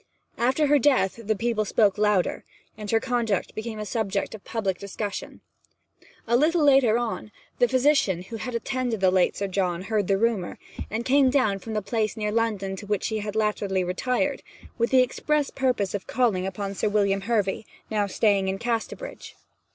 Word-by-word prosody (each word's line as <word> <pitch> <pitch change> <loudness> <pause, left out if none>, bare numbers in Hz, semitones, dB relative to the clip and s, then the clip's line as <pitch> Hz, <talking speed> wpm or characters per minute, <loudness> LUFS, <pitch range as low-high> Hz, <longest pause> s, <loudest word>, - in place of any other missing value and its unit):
After 260 +6 +2
her 290 0 +4
death 240 -6 +2
the 215 0 0
people 225 +1 0
spoke 205 -1 +2
louder, 210 -4 +1 0.3
and 210 -1 -7
her 225 - +3
conduct 230 -6 -1
became 220 0 -5
a 210 - -4
subject 205 -2 -2
of 215 - -10
public 195 -5 -2
discussion. 200 +1 -5 0.8
A 235 - +2
little 310 +5 +3
later 265 -6 +5
on, 235 -2 -3 0.3
the 245 - +5
physician, 255 - +2
who 225 +5 -7
had 245 +2 -5
attended 245 -2 -2
the 190 -1 +4
late 185 -1 +2
Sir 200 - -1
John, 185 -2 -1
heard 210 -2 0
the 195 - +2
rumour, 215 -4 0 0.3
and 225 +2 -3
came 270 0 +4
down 220 -8 +2
from 220 +3 -6
the 210 - -1
place 215 +1 -1
near 210 -1 -1
London 210 -4 -1
to 205 - -9
which 210 -1 -1
he 220 -1 -2
latterly 210 -2 -1
had 180 - -3
retired, 250 +9 -1 0.3
with 235 0 0
the 260 -1 +6
express 295 +3 -1
purpose 250 -7 0
of 205 - -4
calling 215 -7 +1
upon 195 +1 -4
Sir 210 - 0
William 200 -1 +1
Hervy, 210 -1 -1 0.2
now 210 -2 +1
staying 200 -1 +2
in 190 0 -1
Casterbridge. 240 - -4
215 Hz, 180 wpm, -25 LUFS, 195-240 Hz, 0.8 s, the